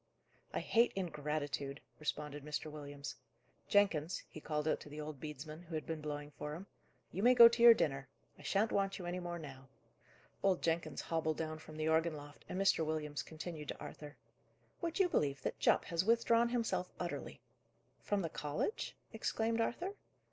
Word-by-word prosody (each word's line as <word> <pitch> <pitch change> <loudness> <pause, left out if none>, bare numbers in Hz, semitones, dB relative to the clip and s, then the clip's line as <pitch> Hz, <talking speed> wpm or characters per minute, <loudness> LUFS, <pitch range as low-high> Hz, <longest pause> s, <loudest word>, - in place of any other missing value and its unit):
"I - - -1
hate 235 +1 +3
ingratitude," 150 -5 -2 0.2
responded 150 -1 -3
Mr. 150 +1 -3
Williams. 145 -2 -7 0.5
"Jenkins," 185 -6 +3
he 155 - -10
called 150 0 -1
out - - +2
to - - -11
the 150 +1 -7
old 150 -2 -5
bedesman, 155 +2 -7
who 165 -1 -6
had 155 - -3
been 160 -1 -3
blowing 150 -1 -4
for 150 +1 -5
him, 180 +4 -8 0.5
"you 190 - -3
may 250 +3 +6
go 235 -1 +12
to 235 0 0
your 235 -1 +11
dinner; 135 -6 0 0.3
I - - -11
shan't 210 +3 +1
want 195 0 +1
you 180 - -6
any 175 +1 -2
more 175 -1 -4
now." 135 -4 -9 0.7
Old 190 -2 +2
Jenkins 165 0 0
hobbled 160 -1 0
down 155 -1 -3
from 155 -1 -11
the 155 0 0
organ 160 0 +3
loft, 145 0 -11
and 185 - -2
Mr. 195 -4 +4
Williams 155 -2 -2
continued 160 -1 -7
to - - -5
Arthur: 150 -1 -8 0.6
"Would 335 -2 -2
you 385 -2 +5
believe 140 - 0
that - - -2
Jupp - - +4
has 170 0 0
withdrawn 230 +2 +4
himself 220 -7 0
utterly?" 170 -6 -4 0.6
"From 205 -2 0
the 165 - -1
college?" 150 - -2 0.2
exclaimed 225 +1 0
Arthur. 350 - -1
160 Hz, 180 wpm, -36 LUFS, 150-195 Hz, 0.7 s, go